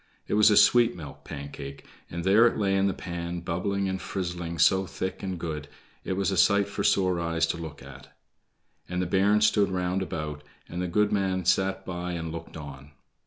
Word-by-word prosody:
It - - -2
was 105 +1 +6
a 105 - +4
sweet 120 -1 +5
milk 75 -5 -10
Pancake, 70 -1 -8 0.2
and 85 0 -5
there 105 +6 +6
it - - -1
lay 100 -2 +1
in 95 0 +3
the 95 - 0
pan 85 0 -5
bubbling 95 +4 -1
and 95 -1 -3
frizzling 85 -3 -4
so 95 +4 +4
thick 95 +1 -4
and 95 -3 -4
good, 75 -3 -4 0.4
it - - -2
was 100 +1 0
a 95 - -1
sight 100 +3 +4
for 100 0 -4
sore 95 -3 +2
eyes 85 0 +1
to 85 - -2
look 75 -4 -8
at. 70 0 -12 0.8
And 90 0 -2
the 90 - 0
bairns 100 +4 +3
stood 105 -2 +3
round 90 0 -1
about, 75 -5 -4 0.2
and 90 - -5
the 90 - -1
goodman 95 -1 +1
sat 95 +2 +1
by 90 0 -4
and 80 -2 -4
looked 80 0 -8
on. 70 -1 -10
90 Hz, 200 wpm, -27 LUFS, 85-95 Hz, 0.8 s, was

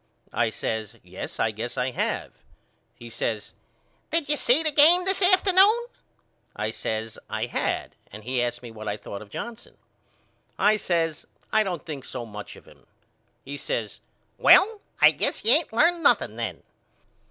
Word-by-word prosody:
I 120 -1 +1
says 110 -1 -5
Yes - - -9
I 110 - +1
guess 115 +4 -6
I 125 +1 -1
have. - - -3 0.6
He 120 - -12
says 115 -2 -4 0.6
Did 325 -3 -1
you 295 - +3
see 285 +2 +2
the 310 - +1
game 330 +5 +7
this 385 +1 +1
afternoon? 385 +4 +5 0.7
I - - -3
says 110 0 -4
I - - -2
had - - -3 0.2
and 105 +2 -11
he 125 +2 -1
asked 120 0 -3
me 120 - -9
what 110 -1 -9
I 105 0 -2
thought 100 -1 -8
of 105 - -13
Johnson. 235 - -8 0.8
I 215 +1 +3
says 165 -5 -2 0.2
I 215 - +4
don't 180 -6 -4
think 150 -5 -7
so 125 -2 -6
much 105 -2 -9
of - - -17
him. - - -20 0.6
He 140 +1 -6
says - - -4 0.4
Well 425 +1 +5 0.2
I - - +7
guess - - -1
you 225 - +5
ain't 315 +4 +4
learned 335 +9 +2
nothing - - +2
then. - - -5
155 Hz, 165 wpm, -25 LUFS, -, 0.8 s, game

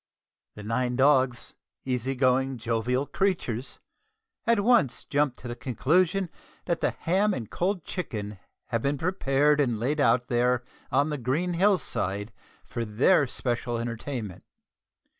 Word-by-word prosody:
The 105 - -9
nine 125 +3 -1
dogs 130 -2 +2 0.3
easy 130 +1 -1
going, 130 0 +2
jovial 120 +3 0
creatures 145 - -2 0.7
at 230 -3 +4
once 220 - +3
jump 145 -3 0
to 125 - -9
the 120 - -5
conclusion 165 - +1 0.3
that 170 -2 -1
the - - +2
ham 195 +5 +1
and 115 -5 -6
cold 180 -1 -1
chicken 105 - -5 0.3
have 115 -3 0
been 140 +2 0
prepared 150 -3 +2
and 120 -6 0
laid 140 +7 -1
out 125 -2 +3
there 125 0 +1 0.3
on 145 +3 +2
the 150 - -3
green 150 +9 0
hill 195 +3 +4
side 105 - -3 0.3
for 120 - -4
their 125 - +3
special 120 -1 -2
entertainment. 115 -3 -5
130 Hz, 140 wpm, -27 LUFS, 120-155 Hz, 0.7 s, at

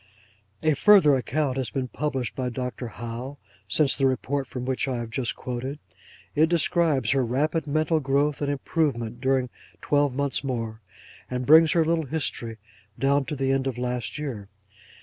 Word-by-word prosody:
A 155 -1 +4
further 180 -1 +6
account 135 +1 0
has 130 -4 -2
been 130 -2 -3
published 135 -2 -3
by 130 -1 -2
Dr. 125 0 -4
Howe, 120 +5 -7 0.3
since 135 +7 +3
the 135 - +2
report 135 +1 -1
from 125 0 -6
which 130 +1 -1
I 130 -2 -1
have 115 -1 -5
just 120 0 -1
quoted. 130 +3 -5 0.6
It 155 +2 +3
describes 170 -4 +2
her 135 -2 +2
rapid 150 +6 0
mental 155 +2 +1
growth 140 +1 0
and 145 - 0
improvement 135 -5 -1
during 130 -2 +1 0.3
twelve 145 -3 +1
months 140 0 0
more, 115 -4 -4 0.5
and 125 0 -3
brings 160 +2 +7
her 165 -2 +3
little 160 -2 0
history 125 -6 -2 0.4
down 140 +1 +2
to 150 - -4
the 135 -1 0
end 135 0 +1
of 130 -3 -3
last 125 -1 -2
year. 120 -10 -5
135 Hz, 170 wpm, -25 LUFS, 125-150 Hz, 0.6 s, brings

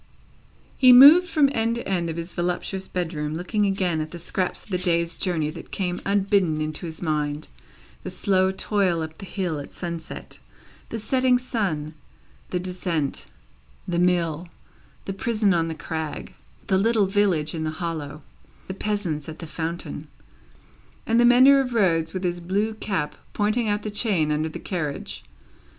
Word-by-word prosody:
He 255 -1 +7
moved 290 +8 +9
from 310 -4 +4
end 230 0 +1
to 235 - -5
end 175 -3 0
of 160 - -4
his 170 +1 -5
voluptuous 180 +2 -2
bedroom, 155 -4 -3
looking 205 +5 0
again 185 -5 0
at 155 - -4
the 175 - -8
scraps 180 +2 -2
of - - -16
the 180 - 0
day's 170 -2 +1
journey 160 -5 -1
that 165 - -10
came 180 -2 -3
unbidden 195 -5 +2
into 155 +2 -3
his 160 +2 -8
mind; 150 -2 -1 0.5
the - - -6
slow 190 -2 +1
toil 190 -3 0
up 160 0 -8
the 195 - -8
hill 180 -7 -2
at 140 - -9
sunset, 170 -2 -7 0.5
the 230 - -4
setting 255 +3 +2
sun, 190 - -2 0.6
the 180 - -1
descent, 180 -5 -3 0.6
the 175 -1 0
mill, 175 -2 +1 0.6
the 195 - -3
prison 210 -1 +1
on 165 -1 +1
the 165 - -4
crag, 160 -1 -5 0.3
the 190 -1 +2
little 220 0 +3
village 190 -6 +1
in 160 -2 -3
the 155 - -1
hollow, 155 -3 -5 0.4
the 190 - -4
peasants 190 -7 -3
at 155 - -8
the 165 - -8
fountain, 165 +2 -5 1.0
and 230 +1 +2
the 240 - +6
mender 260 +3 +7
of 250 -3 -4
roads 165 -6 +2
with 185 0 -4
his 175 -1 -1
blue 200 +5 -1
cap 190 -8 -2 0.2
pointing 215 +3 +1
out 205 0 -1
the 215 - -4
chain 195 -8 +1
under 155 +1 0
the - - -7
carriage. 155 -6 -4
180 Hz, 170 wpm, -24 LUFS, 160-205 Hz, 1.0 s, moved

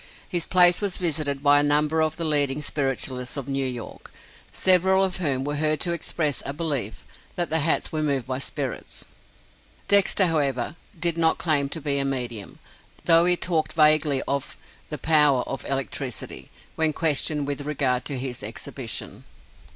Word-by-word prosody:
His 175 -3 -1
place 180 0 +6
was 200 -3 0
visited 150 -5 -2
by 145 0 +6
a - - +2
number 150 +2 +2
of 155 0 -1
the 165 - -2
leading 145 -2 +2
spiritualists 135 -2 -2
of 140 -2 -5
New 135 -1 -1
York, 120 -3 -8 0.4
several 190 +1 +3
of 185 -2 -1
whom 140 -7 -1
were 145 +1 -3
heard 155 0 +1
to 175 - +1
express 155 -4 -1
a 140 - -4
belief 140 -9 -3 0.3
that 175 -3 -2
the 160 - +2
hats 160 +2 0
were 155 - -2
moved 140 -5 -1
by 130 0 -3
spirits! 140 -2 -5 0.8
Dexter, 200 -1 +4
however, 145 -4 -1 0.2
did 170 0 0
not 160 -1 +3
claim 145 -4 +1
to 160 - -5
be 140 -2 -1
a - - 0
medium, 120 -6 -4 0.5
though 165 0 +5
he 180 0 +3
talked 165 -3 -1
vaguely 155 -3 +3
of 140 -1 -3 0.3
"the 150 - -4
power 150 -3 +3
of 135 - -6
electricity," 135 -2 -4 0.3
when 160 -1 +1
questioned 150 -1 +1
with 145 0 -4
regard 135 -4 -1
to 140 - -2
his 125 -1 -4
exhibition. - - -5
150 Hz, 165 wpm, -24 LUFS, 135-160 Hz, 0.8 s, place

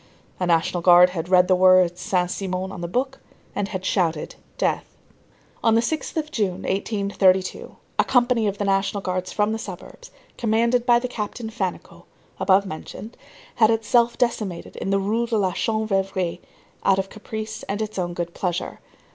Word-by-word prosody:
A 180 - 0
National 170 +1 +1
Guard 180 +1 +7
had 175 -1 -4
read 180 -1 +5
the 185 - +4
words 185 -1 +4
Saint 180 -1 0
Simon 190 -1 -3
on 185 - -7
the 170 - -3
book, 265 +8 -2 0.4
and 200 - -1
had 185 -2 -5
shouted: 165 -5 0 0.2
"Death!" - - -1 0.7
On 225 -1 +4
the 230 - +4
6th 315 +6 -3
of 305 -1 -2
June, 195 -5 -1
1832, 195 -2 0 0.2
a - - +6
company 245 -3 +2
of 200 0 -2
the 205 - -2
National 195 +1 +1
Guards 185 -1 -3
from 210 0 +1
the 220 - -2
suburbs, 185 -5 -9 0.3
commanded 235 +2 +2
by 240 -1 +6
the 245 +1 -2
Captain 220 -1 -5
Fannicot, 235 - -5 0.3
above 195 +1 +4
mentioned, 200 +6 -8 0.4
had 220 -2 +5
itself 230 +1 +2
decimated 215 -8 -2
in - - -3
the 195 - +3
Rue 220 +4 0
de 230 -1 0
la 190 -3 +1
Chanvrerie 195 -5 -1 0.4
out 195 - +4
of 195 0 -2
caprice 215 +1 -6
and 200 +1 -2
its 215 -2 -3
own 175 -1 -2
good 175 -1 -4
pleasure. 175 -2 -3
195 Hz, 170 wpm, -23 LUFS, 185-225 Hz, 0.7 s, Guard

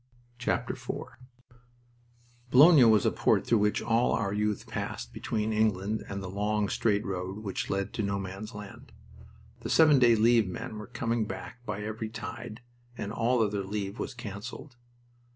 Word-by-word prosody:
IV 120 - +1 1.9
Boulogne 140 -1 +8
was 110 -3 +4
a - - +3
port - - +2
through 115 - +3
which 105 0 +1
all 115 +1 +2
our 100 -2 0
youth 105 0 -1
passed - - -5
between 110 0 -2
England 105 -1 0
and 100 0 -4
the - - -5
long, 105 +2 -1
straight 105 -2 +1
road 95 +2 -4
which 100 -3 -3
led 100 0 -2
to 115 - -2
No 100 -1 -1
Man's 100 +3 -6
Land. 105 -1 -10 0.7
The - - -6
seven 155 -4 +6
day 120 -2 +6
leave 115 -1 +4
men 105 +3 -6
were 105 - -8
coming 120 -2 -1
back 120 +2 -8
by 105 -1 -3
every 110 +1 -4
tide, 110 0 -7 0.4
and 105 +1 -4
all 115 +1 +2
other 100 -2 -1
leave 100 +2 -4
was 130 - -4
canceled. 115 +1 -8
105 Hz, 160 wpm, -29 LUFS, 100-115 Hz, 1.9 s, Boulogne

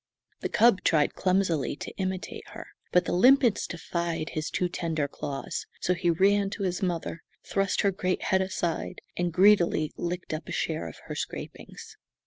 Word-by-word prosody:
The - - -3
cub 225 -5 +4
tried 150 -3 +3
clumsily 185 -8 +1
to - - -8
imitate 185 -1 -4
her, - - -8 0.3
but 180 -1 +4
the - - -1
limpets 245 +4 +5
defied 170 -2 -3
his 155 -1 -3
too 180 - 0
tender 165 -4 -2
claws, 140 -1 -5
so 180 - +1
he 175 0 0
ran 195 +4 +3
to 200 - -3
his 180 +1 -1
mother, 170 -3 -2 0.2
thrust 195 -1 0
her 200 - +3
great 185 -1 -1
head 190 0 +2
aside, 175 -3 -2
and 175 0 0
greedily 180 -4 +4
licked 175 -1 -3
up 155 0 -5
a - - -6
share 160 - -2
of 80 - -9
her - - -5
scrapings. - - -7
180 Hz, 170 wpm, -28 LUFS, 165-190 Hz, 0.3 s, limpets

